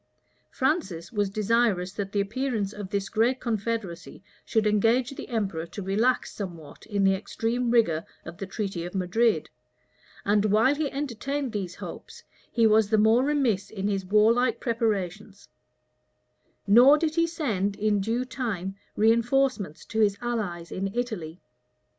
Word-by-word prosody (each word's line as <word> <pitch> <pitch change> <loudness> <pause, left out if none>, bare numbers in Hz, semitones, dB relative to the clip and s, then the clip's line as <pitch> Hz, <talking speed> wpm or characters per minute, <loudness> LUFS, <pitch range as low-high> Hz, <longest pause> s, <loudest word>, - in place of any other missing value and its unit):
Francis 255 - -1
was 205 -3 0
desirous 210 -3 +1
that 195 -2 -4
the 205 - 0
appearance 215 -1 -2
of 205 -2 -7
this 200 -1 -2
great 235 +4 +1
confederacy 220 -6 -4 0.2
should 220 -1 0
engage 225 +5 +2
the 275 - -8
emperor 195 -8 -2
to 200 - -7
relax 220 +7 +1
somewhat 170 -7 -8
in 205 -2 0
the 195 0 +5
extreme 230 +5 -2
rigor 215 -10 +3 0.2
of 170 - -9
the 195 - -5
treaty 195 -4 -4
of 175 +3 -7
Madrid; 190 0 +1 0.7
and 205 +1 +3
while 215 +6 +4
he 290 -1 -2
entertained 275 0 -3
these 195 -5 -4
hopes, - - -9 0.3
he 230 -1 +3
was 215 -1 +4
the 220 - +3
more 220 +4 +4
remiss 265 -9 +1
in 200 -2 -3
his 195 -2 -1
warlike 225 +4 +3
preparations; 210 -4 -2 1.2
nor 245 +8 +7
did 315 0 -1
he 335 0 +2
send 215 - -1
in 210 -1 +1
due 230 +5 -1
time 210 -8 -4 0.2
reënforcements 230 - +1
to 220 - -3
his 205 -2 +3
allies 205 -8 -3
in 195 +1 -3
Italy. 195 -9 -4
215 Hz, 145 wpm, -26 LUFS, 195-240 Hz, 1.2 s, nor